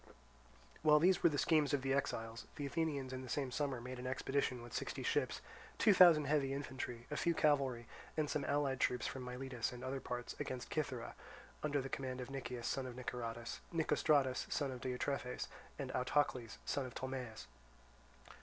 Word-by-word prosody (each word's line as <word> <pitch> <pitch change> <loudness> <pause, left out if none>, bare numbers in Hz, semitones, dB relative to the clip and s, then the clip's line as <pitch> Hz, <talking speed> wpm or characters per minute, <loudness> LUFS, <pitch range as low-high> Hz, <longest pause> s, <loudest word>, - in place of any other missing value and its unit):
While 150 -1 +7
these 180 +4 +5
were 170 - +7
the 145 - -1
schemes 150 -1 +4
of 135 - -3
the 135 0 +2
exiles, 115 -5 -2
the 145 - -3
Athenians 140 -3 -1
in 130 - -4
the 130 - -8
same 135 0 -1
summer 140 -2 -1
made 125 +1 -6
an 125 - -4
expedition 130 -1 0
with 120 - -10
sixty - - -3
ships, - - +1 0.4
two 210 - +6
thousand 170 -5 +8
heavy 140 -1 +2
infantry, 130 -4 -5
a - - -1
few 170 +2 +2
cavalry, 135 -7 +2 0.3
and 155 -1 +2
some 145 0 -1
allied 140 -2 +1
troops 125 - +1
from 130 - -3
Miletus 125 -1 -3
and 125 0 -8
other 130 +1 -2
parts, 125 -1 -4
against 130 -4 -4
Cythera, 130 -6 -2 0.5
under 145 -2 +1
the 135 - -4
command 130 -1 -3
of 125 +1 -5
Nicias, 125 -3 -4
son 135 -1 -1
of 125 - -7
Niceratus, 120 -2 -4
Nicostratus, 150 -5 +2
son 140 -3 0
of 125 -1 -6
Diotrephes, 125 0 -2 0.3
and - - -4
Autocles, 125 -3 +1
son 135 -2 -1
of 125 - -11
Tolmaeus. 130 -4 -4
130 Hz, 180 wpm, -38 LUFS, 125-145 Hz, 0.5 s, thousand